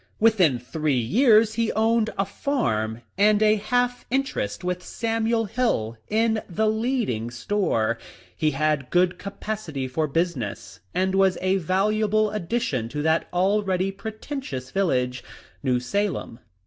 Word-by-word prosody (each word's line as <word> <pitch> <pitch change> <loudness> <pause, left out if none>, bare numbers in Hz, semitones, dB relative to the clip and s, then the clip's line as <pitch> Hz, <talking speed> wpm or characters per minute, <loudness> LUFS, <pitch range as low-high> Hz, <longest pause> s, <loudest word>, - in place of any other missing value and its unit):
Within 195 - +4
three 145 +3 -1
years 220 - +4
he 230 0 0
owned 225 0 +2
a 195 - +1
farm, 120 - -1 0.2
and 210 +1 +5
a 215 0 +5
half 245 +4 0
interest 265 - -1
with 180 0 -2
Samuel 225 +2 -1
Hill 210 - 0
in 220 0 +2
the 215 +5 +1
leading 220 - 0
store. 115 - 0 0.4
He 155 - +1
had 150 -2 0
good 180 0 +2
capacity 200 -8 -4
for 155 +5 -1
business, 150 - -2 0.2
and 190 +1 +1
was 195 -1 +3
a 185 +1 +1
valuable 210 +4 +1
addition 175 - -2
to 150 +3 -3
that 160 +1 +2
already 190 0 +1
preten 220 +8 -6
tious 130 - -6
village 125 -10 0 0.2
— - - -28
New 125 -3 +1
Salem. 185 - -2
195 Hz, 135 wpm, -24 LUFS, 140-220 Hz, 0.4 s, and